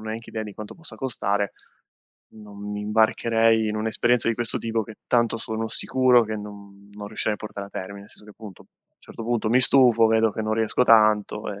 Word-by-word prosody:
neanche 110 Hz, +1 st, -7 dB
idea 110 Hz, -, -4 dB
di 105 Hz, -, -8 dB
quanto 105 Hz, +1 st, -9 dB
possa 165 Hz, -, -8 dB
costare, 100 Hz, -6 st, -2 dB, 0.8 s
non 105 Hz, -2 st, -14 dB
mi 105 Hz, -, -4 dB
imbarcherei 110 Hz, +1 st, +2 dB
in 105 Hz, -, -3 dB
un'esperienza 115 Hz, +2 st, +1 dB
di 115 Hz, -, +1 dB
questo 120 Hz, 0 st, -1 dB
tipo, 115 Hz, -1 st, -2 dB
che 110 Hz, 0 st, -11 dB
tanto 120 Hz, -2 st, +2 dB
sono 110 Hz, 0 st, -4 dB
sicuro 125 Hz, -2 st, +3 dB
che 110 Hz, 0 st, -5 dB
non 100 Hz, -1 st, -11 dB
non 105 Hz, 0 st, -8 dB
riuscirei 105 Hz, 0 st, -2 dB
a -, -, -8 dB
portare 100 Hz, -2 st, -8 dB
a -, -, -25 dB
termine. 100 Hz, +2 st, -7 dB
Nel 100 Hz, -, -15 dB
senso 105 Hz, -, -14 dB
che 105 Hz, -, -14 dB
appunto, 105 Hz, -3 st, -12 dB
a -, -, -24 dB, 0.3 s
un -, -, -69 dB
certo 115 Hz, -, -10 dB
punto 115 Hz, -1 st, -1 dB
mi 125 Hz, +3 st, +4 dB
stufo 125 Hz, -3 st, +4 dB
vedo 110 Hz, -1 st, +2 dB
che 110 Hz, -, -4 dB
non 110 Hz, 0 st, -1 dB
riesco 110 Hz, +2 st, +1 dB
tanto, 110 Hz, -2 st, +3 dB
ehm 100 Hz, -, -10 dB
110 Hz, 215 wpm, -24 LUFS, 105-115 Hz, 0.8 s, mi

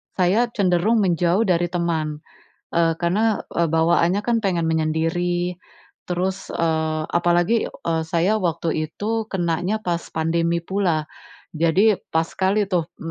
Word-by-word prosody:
saya 195 Hz, +6 st, +2 dB
cenderung 200 Hz, +3 st, +2 dB
menjauh 175 Hz, +2 st, +2 dB
dari 175 Hz, -4 st, +1 dB
teman. 160 Hz, -3 st, -2 dB, 0.5 s
Eee, 165 Hz, -1 st, +3 dB
karena, 205 Hz, +5 st, +1 dB, 0.2 s
eee, 170 Hz, -, +3 dB
bawaannya 170 Hz, +3 st, +3 dB
kan 230 Hz, 0 st, 0 dB
pengen 170 Hz, -4 st, +1 dB
menyendiri, 170 Hz, +3 st, 0 dB, 0.5 s
terus, 185 Hz, +2 st, -2 dB
eee, 160 Hz, -1 st, 0 dB
apalagi, 175 Hz, +6 st, +2 dB
eee, 165 Hz, -1 st, -3 dB
saya 175 Hz, +5 st, +1 dB
waktu 165 Hz, -4 st, -1 dB
itu 225 Hz, +2 st, -2 dB
kenanya 180 Hz, +3 st, -1 dB
pas 175 Hz, -4 st, -1 dB
pandemi 165 Hz, +1 st, 0 dB
pula. 170 Hz, -4 st, -1 dB, 0.5 s
Jadi, 170 Hz, +7 st, +3 dB, 0.2 s
pas 160 Hz, 0 st, +1 dB
sekali 195 Hz, +4 st, 0 dB
tuh, 175 Hz, -4 st, 0 dB
m 165 Hz, -, -5 dB
175 Hz, 130 wpm, -22 LUFS, 165-190 Hz, 0.5 s, Eee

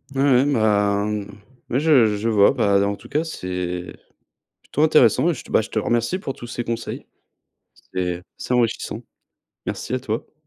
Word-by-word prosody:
Ouais, 135 Hz, -, +1 dB
ouais. 135 Hz, -1 st, +4 dB
Bah, 105 Hz, -3 st, +2 dB
mmh, 105 Hz, -1 st, -2 dB, 0.4 s
ouais, 125 Hz, -, +1 dB
je 130 Hz, -9 st, +4 dB
je 115 Hz, +3 st, -1 dB
vois, 100 Hz, -2 st, +5 dB
bah, 100 Hz, -1 st, +2 dB
en 100 Hz, -, -1 dB
tout -, -, -15 dB
cas, 150 Hz, +3 st, 0 dB
c'est 90 Hz, -, -4 dB, 0.7 s
plutôt 150 Hz, -, -1 dB
intéressant, 150 Hz, -1 st, +5 dB
et 175 Hz, -, +2 dB
je -, -, -8 dB
te -, -, -14 dB
bah, -, -, +4 dB
je -, -, -8 dB
te -, -, -1 dB
remercie 120 Hz, -, 0 dB
pour 135 Hz, -, -4 dB
tous 120 Hz, -, -10 dB
ces 120 Hz, 0 st, -4 dB
conseils. 115 Hz, 0 st, -5 dB, 0.9 s
C'est 90 Hz, -1 st, -2 dB, 0.2 s
c'est -, -, -3 dB
enrichissant. 120 Hz, -2 st, 0 dB, 0.6 s
Merci 125 Hz, -, -4 dB
à 130 Hz, -, +1 dB
toi. 115 Hz, +1 st, -4 dB
115 Hz, 185 wpm, -22 LUFS, 100-130 Hz, 0.9 s, vois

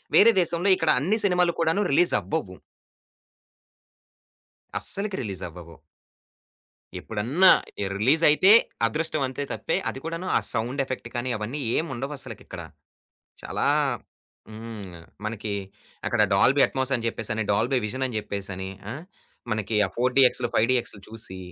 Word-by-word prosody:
వేరే 230 Hz, +3 st, +8 dB
దేశంలో 175 Hz, +3 st, +1 dB
ఇక్కడ 165 Hz, -3 st, -1 dB
అన్ని 190 Hz, +10 st, +1 dB
సినిమాలు 180 Hz, -3 st, +3 dB
కూడాను 165 Hz, +5 st, +2 dB
రిలీజవ్వవు. 155 Hz, -, +1 dB, 2.2 s
అస్సలకి 200 Hz, 0 st, 0 dB
రిలీజవ్వవు. 90 Hz, -5 st, -7 dB, 1.3 s
ఎప్పుడన్నా 125 Hz, -, +3 dB, 0.3 s
ఎ -, -, -1 dB
రిలీజయితే 150 Hz, -, +5 dB, 0.4 s
అదృష్టవంతే 145 Hz, 0 st, -2 dB
తప్పే, -, -, -1 dB
అది 135 Hz, -, -6 dB
కూడాను 165 Hz, +3 st, -5 dB
ఆ -, -, +3 dB
సౌండ్ 125 Hz, +5 st, -1 dB
ఎఫెక్ట్ 130 Hz, -3 st, -6 dB
కానీ 120 Hz, +1 st, -2 dB
అవన్నీ 115 Hz, +8 st, -5 dB, 0.2 s
ఏముండవు 145 Hz, -3 st, -3 dB
అసలకిక్కడ. -, -, -7 dB, 0.8 s
చాలా -, -, -2 dB, 0.9 s
హ్మ్. 105 Hz, -6 st, -9 dB, 0.2 s
మనకి 110 Hz, -1 st, -4 dB, 0.5 s
అక్కడ 115 Hz, -3 st, +2 dB
డాల్‌బి 135 Hz, +8 st, +4 dB
అట్‌మోస్ 130 Hz, 0 st, -2 dB
అని 115 Hz, -, -2 dB
జెప్పేసని, 110 Hz, -1 st, -2 dB
డాల్‌బి 120 Hz, +6 st, +1 dB
విజన్ 130 Hz, +5 st, -3 dB
అని 120 Hz, -, -5 dB
జెప్పేసని, 95 Hz, -2 st, -5 dB, 0.2 s
ఆ! -, -, -4 dB, 0.6 s
మనకి 110 Hz, 0 st, -1 dB
ఆ -, -, -8 dB
ఫోర్ 125 Hz, +1 st, +1 dB
డి‌ఎక్సులు, 125 Hz, -2 st, +4 dB
ఫైవ్ 110 Hz, -, +4 dB
డి‌ఎక్సులు 120 Hz, -5 st, -2 dB
చూసి 110 Hz, -4 st, -7 dB
125 Hz, 120 wpm, -25 LUFS, 110-155 Hz, 2.2 s, వేరే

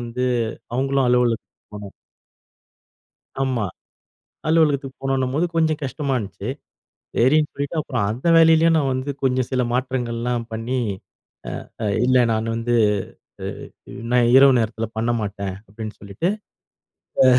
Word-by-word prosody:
வந்து 120 Hz, +2 st, -2 dB, 0.5 s
அவுங்களும் 135 Hz, 0 st, +1 dB
அலுவலகத்துக்கு 120 Hz, -3 st, 0 dB
போணும். 100 Hz, -1 st, -8 dB, 1.5 s
ஆமா. 130 Hz, -5 st, 0 dB, 0.8 s
அலுவலகத்துக்கு 145 Hz, -4 st, +2 dB
போணுன்னம்போது 135 Hz, +4 st, +1 dB
கொஞ்சம் 160 Hz, -1 st, +2 dB
கஷ்டமா 135 Hz, 0 st, -2 dB
இருந்துச்சு. 100 Hz, +1 st, -7 dB, 0.7 s
சரின்னு 150 Hz, +5 st, +4 dB
சொல்லிட்டு 140 Hz, +3 st, -4 dB
அப்புறம் 125 Hz, -8 st, -1 dB
அந்த 125 Hz, +9 st, -2 dB
வேலையிலயும் 165 Hz, 0 st, +6 dB
நான் 140 Hz, -3 st, +2 dB
வந்து 130 Hz, +2 st, -2 dB
கொஞ்சம் 130 Hz, -2 st, +1 dB
சில 130 Hz, -1 st, +1 dB
மாற்றங்கள்லாம் 120 Hz, -2 st, -1 dB
பண்ணி, 115 Hz, +4 st, -2 dB, 0.9 s
அ 115 Hz, -, -11 dB
அ -, -, 0 dB, 0.2 s
இல்லை 130 Hz, -1 st, +5 dB
"நான் 110 Hz, 0 st, 0 dB
வந்து 120 Hz, +1 st, 0 dB, 0.7 s
அ -, -, -3 dB, 0.4 s
அ -, -, -9 dB, 0.2 s
நான் 120 Hz, -1 st, +4 dB
இரவு 135 Hz, -1 st, +8 dB
நேரத்தில 110 Hz, 0 st, -2 dB
பண்ண 115 Hz, +2 st, 0 dB
மாட்டேன்." 100 Hz, -2 st, -4 dB
அப்படின்னு 110 Hz, +1 st, -7 dB
சொல்லிட்டு. 100 Hz, -, -2 dB, 0.9 s
அ -, -, +6 dB
125 Hz, 125 wpm, -22 LUFS, 115-140 Hz, 1.5 s, இரவு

